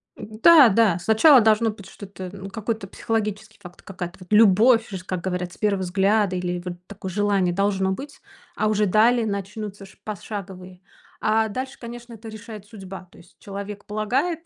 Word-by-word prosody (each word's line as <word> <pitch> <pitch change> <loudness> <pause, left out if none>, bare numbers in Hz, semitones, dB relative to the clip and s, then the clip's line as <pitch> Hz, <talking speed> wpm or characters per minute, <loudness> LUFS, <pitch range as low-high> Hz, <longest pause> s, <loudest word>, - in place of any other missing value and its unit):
М-да, 245 +5 +6
да, 200 -4 +3
сначала 235 - +6
должно 220 +1 +3
быть 205 -3 -9
что-то, 190 -2 -9
ну, 195 0 -8
какой-то 220 -1 -4
психологический 215 0 -4
факт, 180 0 -13
какая-то 180 -2 -8
вот 180 - -14
любовь, 225 +3 +5
ж 185 -2 -7
как 185 -2 -4
говорят, 180 -1 -3
с - - -16
первого 200 -3 0
взгляда 195 +1 +1
или 180 0 -2
вот 180 -1 -5
такое 195 -2 -7
желание 200 -2 +1
должно 195 0 0
быть, 280 +8 -7 0.4
а 215 - 0
уже 210 0 +2
далее 225 +4 +3
начнутся 200 0 -5
ш 190 - -18
пошаговые 190 -3 -8 0.4
А 220 +1 +2
дальше, 260 +5 -5
конечно, 240 0 -9
это 225 0 -10
решает 215 -1 -10
судьба. 195 -3 -10
То - - -19
есть 170 - -19
человек 200 +1 -8
полагает, 265 +11 -1
205 Hz, 170 wpm, -23 LUFS, 190-220 Hz, 0.4 s, М-да